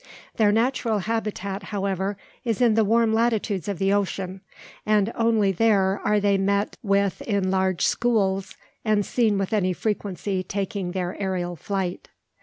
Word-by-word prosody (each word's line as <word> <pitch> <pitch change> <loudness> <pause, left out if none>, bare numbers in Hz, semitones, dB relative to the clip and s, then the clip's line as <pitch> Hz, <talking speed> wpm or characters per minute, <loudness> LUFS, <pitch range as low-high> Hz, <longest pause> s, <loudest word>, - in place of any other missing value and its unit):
Their 215 -3 +4
natural 230 0 +1
habitat, 205 -2 -3
however, 195 -1 -2 0.3
is 230 -4 -1
in 240 -3 +4
the 225 0 +3
warm 225 +1 +3
latitudes 220 -5 0
of 200 -3 -2
the 195 +3 +2
ocean; 190 -1 -2 0.4
and 210 0 +2
only 225 -4 +2
there 195 -1 +2
are 210 0 +3
they 200 -1 +2
met 200 +1 0
with 200 -2 +1
in 200 -4 0
large 190 -2 +1
"schools," 195 -5 +1 0.3
and 215 -2 +2
seen 220 -5 +1
with 195 +2 -2
any 185 -3 +2
frequency 195 -1 -2
taking 195 -1 -3
their 180 -1 -2
aerial 180 -2 -2
flight. 190 +1 -4
200 Hz, 150 wpm, -24 LUFS, 190-220 Hz, 0.4 s, Their